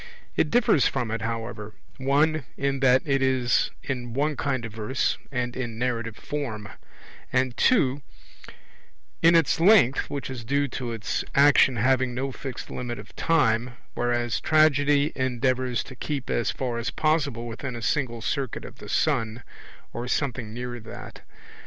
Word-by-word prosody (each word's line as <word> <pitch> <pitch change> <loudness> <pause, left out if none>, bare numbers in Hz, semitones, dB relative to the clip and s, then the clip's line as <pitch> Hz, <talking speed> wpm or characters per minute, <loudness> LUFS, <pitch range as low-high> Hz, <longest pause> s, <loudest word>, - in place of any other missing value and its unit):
It - - +2
differs 235 - +4
from 115 -3 -2
it, 115 -1 -2
however, 115 -1 -5 0.2
(1) 145 +3 +2
in 140 0 0
that 130 -1 +4
it 135 -2 +1
is 130 -2 +2
in 120 -3 -4
one 150 +2 +1
kind 130 -4 -1
of 110 - -8
verse 110 +4 -1
and 125 -2 -2
in 120 -4 -4
narrative 115 -2 -2
form; 110 -9 -5 0.6
and 130 -1 +1
(2) 145 - +3 1.2
in 170 +1 +6
its 165 -1 +3
length 170 - +5
which 140 -1 -4
is 125 -4 -6
due 140 +4 +1
to 125 -1 -4
its 105 -5 -2
action 140 -2 +6
having 130 +1 +2
no 135 +2 -2
fixed 130 0 -7
limit 120 -1 -4
of - - -12
time, 120 -6 +1 0.2
whereas 120 -1 0
Tragedy 145 -2 +4
endeavours 130 -1 0
to 130 - -11
keep 140 +1 -4
as 120 - +1
far 120 -3 -2
as 120 +3 -2
possible 140 -4 0
within 120 +2 -5
a 120 - -6
single 120 -6 -1
circuit 135 -2 -2
of - - -12
the - - -10
sun, 115 +1 0 0.5
or 120 +1 -4
something 125 -4 -2
near 120 +1 -5
that. 110 - -10
130 Hz, 155 wpm, -26 LUFS, 120-140 Hz, 1.2 s, in